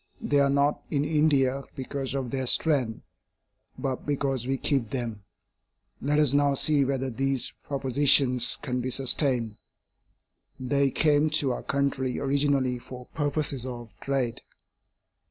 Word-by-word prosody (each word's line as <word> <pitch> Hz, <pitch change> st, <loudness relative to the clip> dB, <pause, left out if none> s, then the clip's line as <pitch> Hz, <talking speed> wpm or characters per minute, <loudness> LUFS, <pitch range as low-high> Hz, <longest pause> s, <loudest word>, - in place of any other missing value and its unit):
They 145 Hz, 0 st, +1 dB
are 140 Hz, 0 st, +3 dB
not 140 Hz, +1 st, +1 dB
in 145 Hz, -2 st, 0 dB
India 140 Hz, -4 st, +2 dB
because 135 Hz, 0 st, -4 dB
of 130 Hz, -3 st, -3 dB
their 130 Hz, -1 st, -2 dB
strength, 130 Hz, -6 st, +1 dB, 0.7 s
but 130 Hz, -2 st, -3 dB
because 135 Hz, -4 st, -2 dB
we 135 Hz, 0 st, 0 dB
keep 135 Hz, -5 st, 0 dB
them. 115 Hz, -5 st, -4 dB, 0.8 s
Let 145 Hz, +2 st, +1 dB
us 150 Hz, -3 st, +3 dB
now 145 Hz, -1 st, +3 dB
see 145 Hz, +1 st, +3 dB
whether 135 Hz, -1 st, -1 dB
these 135 Hz, +1 st, -1 dB
propositions 135 Hz, -2 st, +3 dB
can 125 Hz, -3 st, -2 dB
be 130 Hz, -, -3 dB
sustained. 125 Hz, -4 st, 0 dB, 1.0 s
They 140 Hz, +2 st, +1 dB
came 150 Hz, +2 st, +2 dB
to 135 Hz, -3 st, 0 dB
our 125 Hz, -, -3 dB
country 140 Hz, -3 st, -1 dB
originally 140 Hz, -2 st, +1 dB
for 125 Hz, +1 st, -10 dB
purposes 145 Hz, -3 st, -1 dB
of 120 Hz, -3 st, -7 dB
trade. 130 Hz, -4 st, -2 dB
135 Hz, 135 wpm, -27 LUFS, 125-140 Hz, 1.0 s, are